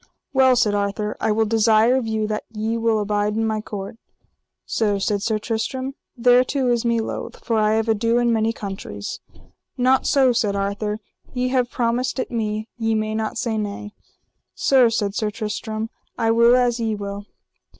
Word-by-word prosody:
Well, 260 Hz, -1 st, +5 dB
said 210 Hz, -3 st, +2 dB
Arthur, 205 Hz, +1 st, -1 dB
I 220 Hz, -, +2 dB
will 220 Hz, +1 st, +2 dB
desire 225 Hz, +2 st, +4 dB
of 255 Hz, -3 st, -1 dB
you 220 Hz, -1 st, -1 dB
that 215 Hz, 0 st, -3 dB
ye 220 Hz, +1 st, -2 dB
will 230 Hz, -1 st, +1 dB
abide 210 Hz, 0 st, 0 dB
in 225 Hz, 0 st, 0 dB
my 220 Hz, -1 st, -1 dB
court. 205 Hz, 0 st, -7 dB, 0.7 s
Sir, 210 Hz, -3 st, 0 dB
said 200 Hz, +1 st, -1 dB
Sir 220 Hz, +1 st, 0 dB
Tristram, 245 Hz, +5 st, -3 dB, 0.3 s
thereto 250 Hz, +2 st, +3 dB
is 235 Hz, -1 st, +1 dB
me 235 Hz, -1 st, +1 dB
loath, 220 Hz, -, -5 dB
for 230 Hz, -, 0 dB
I 215 Hz, 0 st, +3 dB
have 220 Hz, 0 st, +1 dB
ado 230 Hz, +2 st, +2 dB
in 240 Hz, -1 st, +2 dB
many 220 Hz, 0 st, +1 dB
countries. 195 Hz, -, -6 dB, 0.6 s
Not 255 Hz, +1 st, +3 dB
so, 265 Hz, -3 st, +4 dB
said 210 Hz, -3 st, 0 dB
Arthur, 205 Hz, +2 st, -2 dB, 0.3 s
ye 250 Hz, 0 st, 0 dB
have 250 Hz, -2 st, +1 dB
promised 245 Hz, +2 st, -1 dB
it 255 Hz, -, -3 dB
me, 215 Hz, -2 st, -2 dB
ye 225 Hz, -1 st, +1 dB
may 215 Hz, 0 st, -1 dB
not 220 Hz, 0 st, -2 dB
say 225 Hz, -2 st, -1 dB
nay. 210 Hz, 0 st, -5 dB, 0.6 s
Sir, 260 Hz, -3 st, +4 dB
said 205 Hz, -3 st, -1 dB
Sir 215 Hz, +1 st, -1 dB
Tristram, 215 Hz, +1 st, -4 dB, 0.3 s
I 225 Hz, 0 st, +2 dB
will 235 Hz, +1 st, +5 dB
as 245 Hz, -1 st, +2 dB
ye 225 Hz, -2 st, -1 dB
will. 200 Hz, 0 st, -6 dB
220 Hz, 180 wpm, -22 LUFS, 210-235 Hz, 0.7 s, Well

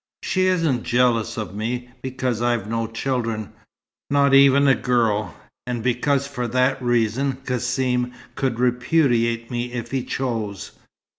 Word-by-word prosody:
She 185 Hz, 0 st, +1 dB
isn't 165 Hz, -9 st, +1 dB
jealous 115 Hz, -2 st, +1 dB
of 105 Hz, -4 st, -4 dB
me, 120 Hz, +4 st, -3 dB
because 130 Hz, -3 st, -2 dB
I've 120 Hz, -4 st, 0 dB
no 115 Hz, 0 st, -1 dB
children, 115 Hz, -2 st, -3 dB, 0.6 s
not 140 Hz, -1 st, +3 dB
even 140 Hz, +1 st, +6 dB
a 135 Hz, -, +6 dB
girl, 110 Hz, -, 0 dB, 0.3 s
and 120 Hz, -2 st, -3 dB
because 130 Hz, +3 st, +1 dB
for 125 Hz, -3 st, -4 dB
that 130 Hz, +3 st, +1 dB
reason 120 Hz, +2 st, +1 dB
Cassim 125 Hz, 0 st, 0 dB, 0.2 s
could 130 Hz, -4 st, -2 dB
repudiate 125 Hz, -2 st, +1 dB
me 120 Hz, 0 st, -3 dB
if 120 Hz, -2 st, -5 dB
he 135 Hz, -2 st, -1 dB
chose. 115 Hz, -7 st, -3 dB
125 Hz, 135 wpm, -22 LUFS, 115-130 Hz, 0.6 s, even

